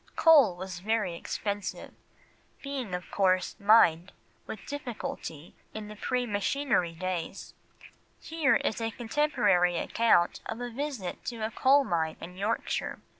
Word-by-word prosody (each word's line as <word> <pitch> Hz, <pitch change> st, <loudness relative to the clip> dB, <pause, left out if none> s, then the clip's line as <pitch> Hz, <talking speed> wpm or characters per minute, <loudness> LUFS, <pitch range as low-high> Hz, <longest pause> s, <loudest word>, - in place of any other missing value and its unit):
Coal 290 Hz, -, +6 dB
was 185 Hz, 0 st, -7 dB
very 210 Hz, -2 st, 0 dB
expensive, 205 Hz, +3 st, -4 dB, 0.7 s
being 265 Hz, -9 st, -4 dB
of 180 Hz, -, -8 dB
course 185 Hz, -2 st, +1 dB
mined 200 Hz, -4 st, +5 dB, 0.4 s
with 215 Hz, -, -7 dB
difficulty 235 Hz, -, -6 dB, 0.2 s
in 215 Hz, -1 st, -6 dB
the 210 Hz, -, -8 dB
pre 250 Hz, +3 st, -1 dB
machinery 205 Hz, -3 st, 0 dB
days; 180 Hz, -1 st, -4 dB, 0.7 s
here 320 Hz, -4 st, +1 dB
is 220 Hz, -, -1 dB
a 225 Hz, -, 0 dB
contemporary 210 Hz, -, +1 dB
account 195 Hz, -6 st, +2 dB
of 225 Hz, -, -5 dB
a 245 Hz, 0 st, -5 dB
visit 260 Hz, -7 st, -5 dB
to 235 Hz, -2 st, -5 dB
a 220 Hz, -, -4 dB
coal 275 Hz, +4 st, +4 dB
mine 160 Hz, -8 st, -1 dB
in 180 Hz, +2 st, -9 dB
Yorkshire. 205 Hz, +4 st, -2 dB
210 Hz, 130 wpm, -29 LUFS, 180-245 Hz, 0.7 s, Coal